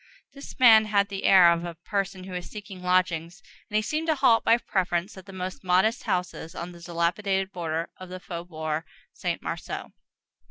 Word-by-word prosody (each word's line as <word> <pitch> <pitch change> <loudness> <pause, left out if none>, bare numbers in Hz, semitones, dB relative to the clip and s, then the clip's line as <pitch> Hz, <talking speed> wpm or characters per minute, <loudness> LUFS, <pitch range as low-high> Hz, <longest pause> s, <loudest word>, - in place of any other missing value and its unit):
This 275 0 -11
man 225 -4 +7
had 200 -1 +2
the 195 -1 -5
air 180 -3 +8
of 170 0 0
a 170 -1 -6
person 190 +2 -3
who 185 0 -8
is 180 -1 -5
seeking 200 -3 -9
lodgings, 180 0 0 0.3
and 210 - -6
he 215 - +3
seemed 310 +8 -2
to 315 - +3
halt, 255 -5 +4
by 230 - +5
preference, 185 -3 -1
at 190 0 -12
the - - -9
most 185 0 -6
modest 190 +6 +2
houses 180 -2 -3
on 175 +1 -5
that 170 -1 -12
dilapidated 190 +3 0
border 165 -2 -3
of 185 -1 -10
the 185 0 -7
faubourg 165 -3 -4 0.3
Saint - - -3
Marceau. - - -5
185 Hz, 190 wpm, -26 LUFS, 175-205 Hz, 0.3 s, air